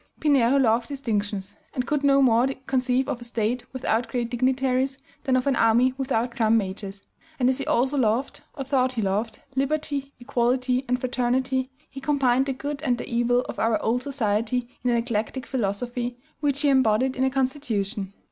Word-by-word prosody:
Pinheiro 275 -4 +4
loved 235 -3 +3
distinctions, 210 -8 -3 0.2
and 250 - -1
could 295 -1 -1
no 275 -1 +5
more 240 0 +4 0.2
conceive 255 0 +1
of 240 - -3
a - - -6
State 235 +1 -2
without 245 -3 -1
great 240 -2 -2
dignitaries 260 +1 +1 0.3
than 260 -2 +2
of 255 - +1
an 275 -2 +2
army 235 +3 +4
without 250 -3 -1
drum 225 0 +3
majors; 195 -1 -4 0.4
and 250 0 +3
as 260 - +1
he - - -4
also 265 +4 +2
loved, 235 +3 0
or 270 - -4
thought 260 -1 +1
he 230 - -1
loved, 210 +3 -2
liberty, 280 0 -1
equality, 255 +1 0
and 250 +1 +1
fraternity, 255 +1 0 0.2
he 270 - -10
combined 270 -2 +2
the 270 - 0
good 285 +2 -5
and 250 -6 +1
the - - -6
evil 240 +1 +2
of - - -7
our 225 -1 +2
old 240 +3 +1
society 240 -2 -1 0.2
in 250 - +1
an 240 - +3
eclectic 235 +2 -2
philosophy 240 +1 -2 0.2
which 285 -2 0
he 290 - +3
embodied 260 -1 +3
in 260 - 0
a 265 - +3
constitution. 245 -7 -2
250 Hz, 180 wpm, -25 LUFS, 230-265 Hz, 0.4 s, no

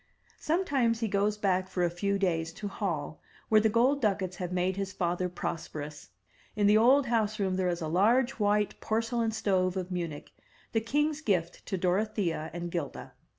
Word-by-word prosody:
Sometimes 280 -9 +1
he 225 - +1
goes 205 +1 +1
back 190 -2 +1
for 185 -1 -1
a 175 - +3
few 200 +3 -1
days 165 -4 0
to 205 - -6
Hall, 170 -7 -3 0.3
where 215 -1 +6
the 220 - +3
gold 255 +6 +3
ducats 190 -4 0
have 180 -1 -4
made 180 +1 0
his 195 -1 -3
father 180 -1 -1
prosperous. 150 -4 -6 0.5
In 210 -1 +2
the 205 +1 +6
old 260 +6 +5
house 220 -3 0
room 190 -2 0
there 185 -1 +1
is 175 0 -2
a 160 - -2
large 230 +10 +3
white 210 0 +1
por 220 +1 +1
celain 230 -1 -1
stove 190 -4 0
of 185 0 -4
Munich, 170 -5 -4 0.4
the 225 - +1
king's 295 +6 0
gift 180 - -1
to 190 - -1
Dorothea 180 -3 0
and 175 0 -5
'Gilda. 165 -6 -5
195 Hz, 185 wpm, -29 LUFS, 180-220 Hz, 0.5 s, where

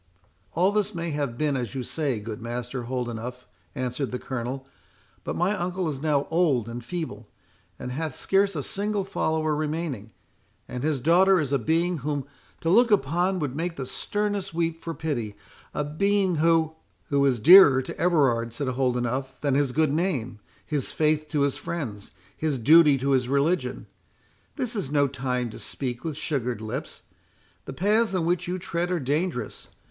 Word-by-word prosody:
"All 180 +4 +3
this 210 -3 0
may 170 -1 -3
have 140 -5 -2
been 150 -1 +1
as 125 -1 -3
you 130 - -2
say, 140 -5 -1
good 105 +1 -7
Master 120 +1 -4
Holdenough," 125 -1 -3 0.4
answered 130 0 -2
the 125 - -2
Colonel; 130 +1 -4 0.6
"but - - -3
my 185 +4 +1
uncle 180 -1 -2
is 140 -3 -4
now 145 -2 +1
old 155 -9 +2
and 120 +1 -6
feeble, 120 -8 -5 0.5
and 125 - -6
hath 155 +1 -3
scarce 195 0 +2
a 145 - -2
single 205 +3 -1
follower 160 -5 0
remaining, 150 -7 -3 0.6
and 125 - -5
his 150 -1 0
daughter 180 +7 +5
is 145 -3 -1
a 140 - +3
being 165 +7 +1
whom 145 0 -2 0.4
to 165 - 0
look 235 +5 +5
upon 185 -1 +2
would 145 -6 -3
make 165 +2 -2
the 135 - -4
sternest 205 +3 -2
weep 165 -1 -1
for 165 -1 -5
pity; 120 -10 -3 0.4
a 150 - -2
being 190 +4 +1
who"— 160 0 +3 0.4
"Who 140 -1 +2
is 125 -3 +1
dearer 145 - +8
to - - -6
Everard," 135 -9 +2
said 140 -1 -2
Holdenough, 125 0 0
"than 145 -2 +1
his 140 -1 +2
good 155 +1 +2
name, 135 - -1 0.3
his 145 -4 -1
faith 155 -1 +1
to 150 -2 0
his 140 -1 +1
friends, 115 -12 -5 0.3
his 155 -3 -1
duty 150 +3 +6
to 135 +2 0
his 125 -2 +2
religion;—this 180 - -3
is 195 -11 -2
no 145 -1 +3
time 125 -3 -2
to - - -10
speak 125 -3 -4
with 160 -3 -4
sugared 125 -8 -2
lips. 110 0 -6 0.6
The - - -6
paths 210 +6 +2
in 175 -3 0
which 175 +1 0
you 180 +1 -2
tread 175 -1 -2
are 180 -1 0
dangerous. 145 - -2
150 Hz, 175 wpm, -26 LUFS, 125-170 Hz, 0.6 s, dearer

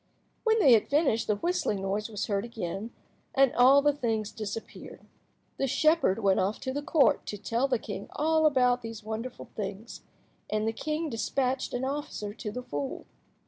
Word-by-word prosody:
When 445 -1 +3
they 280 - +6
had 220 - +4
finished 280 -6 +2
the 210 - +2
whistling 210 - -1
noise 205 +3 -2
was 210 -2 -3
again 205 -3 -3
heard, 215 +4 -6 0.4
and 270 -2 +4
all 265 +3 +6
the 295 0 +4
things 225 -6 -2
disappeared. 215 +1 -7 0.5
The 270 - 0
shepherd 310 - +3
went 195 -1 +4
off 200 +3 0
to 260 - -3
the 290 - -2
Court 290 0 +3
to 205 - -4
tell 230 +6 0
the 255 -2 +1
king 200 -3 -7
all 315 +1 +3
about 250 -3 +3
these 225 -2 -7
wonderful 220 +3 -6
things, 205 +2 -6 0.5
and 215 +1 0
the 225 - 0
king 310 +6 -2
despatched 255 +3 -1
an 250 +1 -1
officer 270 -7 -4
to 210 -1 -6
the 250 +4 -6
fool. 145 - -5
230 Hz, 180 wpm, -28 LUFS, 210-275 Hz, 0.5 s, they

